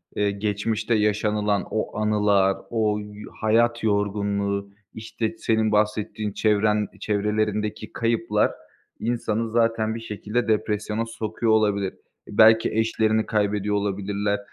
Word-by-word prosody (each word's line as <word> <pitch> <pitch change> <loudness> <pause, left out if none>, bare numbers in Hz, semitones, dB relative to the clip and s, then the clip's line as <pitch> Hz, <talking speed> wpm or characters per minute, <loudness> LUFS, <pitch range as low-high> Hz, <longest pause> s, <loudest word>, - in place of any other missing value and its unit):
eee, 105 -1 +1
geçmişte 105 +2 -1
yaşanılan 105 -1 +1
o 110 - -2
anılar, 105 -2 +2
o 110 -2 0
y 105 0 -9 0.2
hayat 115 +2 +2
yorgunluğu, 100 -1 0 0.2
işte, 110 0 -4
senin 110 -1 +1
bahsettiğin 105 0 0
çevren 105 0 +2
çevrelerindeki 105 0 -1
kayıplar 115 -2 +1 0.5
insanı 115 -1 -1
zaten 115 -1 +1
bir - - -5
şekilde 110 +2 -3
depresyona 105 0 0
sokuyor 115 0 -2
olabilir. 100 -3 +1 0.3
Belki 110 +2 +5
eşlerini 110 0 +1
kaybediyor 105 -1 0
olabilirler. 100 0 -1
105 Hz, 105 wpm, -24 LUFS, 105-110 Hz, 0.5 s, Belki